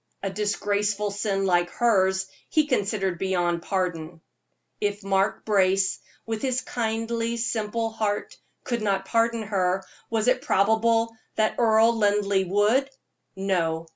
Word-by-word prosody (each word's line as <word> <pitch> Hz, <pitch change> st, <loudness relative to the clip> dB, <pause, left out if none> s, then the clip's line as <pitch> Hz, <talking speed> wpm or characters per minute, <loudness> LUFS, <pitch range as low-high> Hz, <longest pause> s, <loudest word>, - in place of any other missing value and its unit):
A 195 Hz, -, -2 dB
disgraceful 205 Hz, 0 st, -1 dB
sin 200 Hz, -1 st, -1 dB
like 175 Hz, -2 st, +2 dB
hers 190 Hz, -5 st, +2 dB, 0.2 s
he 310 Hz, -1 st, +3 dB
considered 200 Hz, -, -1 dB
beyond 175 Hz, -3 st, 0 dB
pardon. 170 Hz, -3 st, -3 dB, 0.6 s
If 205 Hz, 0 st, -2 dB
Mark 195 Hz, +1 st, 0 dB
Brace, 190 Hz, -2 st, +2 dB, 0.3 s
with 225 Hz, -1 st, -3 dB
his 255 Hz, -1 st, 0 dB
kindly, 230 Hz, 0 st, -2 dB
simple 225 Hz, 0 st, -2 dB
heart, 215 Hz, -2 st, -2 dB, 0.3 s
could 240 Hz, -2 st, -2 dB
not 195 Hz, -2 st, 0 dB
pardon 230 Hz, +1 st, +1 dB
her, 190 Hz, -2 st, 0 dB, 0.3 s
was 225 Hz, 0 st, 0 dB
it 255 Hz, -, +3 dB
probable 225 Hz, +3 st, +2 dB, 0.2 s
that 215 Hz, 0 st, 0 dB
Earl 225 Hz, 0 st, +4 dB
Linleigh 205 Hz, -2 st, +2 dB
would? 210 Hz, +8 st, +2 dB, 0.5 s
No! 165 Hz, -4 st, -1 dB
205 Hz, 125 wpm, -25 LUFS, 190-225 Hz, 0.6 s, Earl